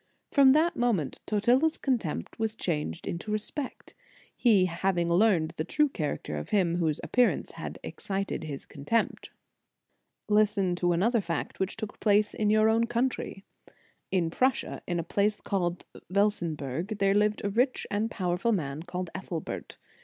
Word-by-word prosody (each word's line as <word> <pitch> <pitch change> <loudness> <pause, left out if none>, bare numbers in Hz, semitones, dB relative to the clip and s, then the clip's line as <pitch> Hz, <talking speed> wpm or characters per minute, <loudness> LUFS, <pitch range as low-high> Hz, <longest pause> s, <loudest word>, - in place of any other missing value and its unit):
From 270 -2 +7
that 320 +3 +3
moment 225 - 0
Totila 240 +7 +3
s 320 - -3
contempt 215 - -2
was 220 0 -1
changed 150 - -2
into 170 +5 -4
respect, 215 +6 -4 0.4
he 210 -7 +4
having 175 0 0
learned 170 -3 +3
the 155 - 0
true 300 - +2
character 155 - -3
of - - -6
him 180 -5 +2
whose 160 -4 0
appearance 250 -1 +2
had - - -7
excited 195 -3 -3
his 145 -3 -6
contempt."* 155 +11 -1 1.0
Listen 210 -3 +3
to 175 -1 +2
another 220 +7 +2
fact 170 -3 -4
which 190 0 -2
took 220 -2 -6
place 210 0 +3
in 210 -1 0
your 215 +1 +5
own 225 +1 +3
country. 240 -4 -2 0.7
In 175 -4 +1
Prussia, 255 +6 0
in 175 - -1
a - - -1
place 205 +5 +1
called 175 -3 -2 0.2
Velsenberg, 180 - -1
there 195 -1 +3
lived 210 +1 +1
a 200 - 0
rich 250 +5 +1
and 210 +2 0
pow 180 -5 -1
erful 230 +5 +1
man 145 -4 -3
called 180 0 -5
Ethelbert. 170 -4 -5
200 Hz, 155 wpm, -28 LUFS, 175-220 Hz, 1.0 s, From